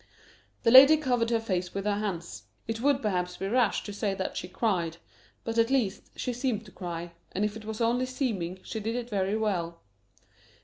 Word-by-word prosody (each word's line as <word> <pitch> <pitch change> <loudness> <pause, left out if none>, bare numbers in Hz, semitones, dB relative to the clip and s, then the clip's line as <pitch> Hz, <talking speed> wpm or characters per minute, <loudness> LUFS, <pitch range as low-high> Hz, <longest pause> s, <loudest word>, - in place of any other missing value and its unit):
The 230 - +4
lady 275 +5 +10
covered 245 -6 +1
her 230 -1 +2
face 185 -5 -2
with 195 0 -3
her 205 -1 +1
hands. 175 -5 -4 0.2
It 225 0 -3
would, 280 0 +2
perhaps, 180 -3 -1
be 195 - -3
rash 235 0 +2
to 205 - -7
say 200 -1 -1
that 190 -1 -3
she - - -4
cried; 180 -4 -1 0.5
but, 230 0 -1
at 230 +1 +4
least, 240 -7 0
she 250 - -2
seemed 240 -3 -2
to 190 - -13
cry, 175 -2 -6 0.2
and 200 +3 +1
if 210 0 -3
it 220 -1 -9
was 220 +1 -5
only 240 +2 +2
seeming, 215 -10 -2
she 220 - -5
did 225 +2 -2
it 245 -1 -4
very 195 +1 0
well. 175 -6 -1
215 Hz, 205 wpm, -28 LUFS, 190-235 Hz, 0.5 s, lady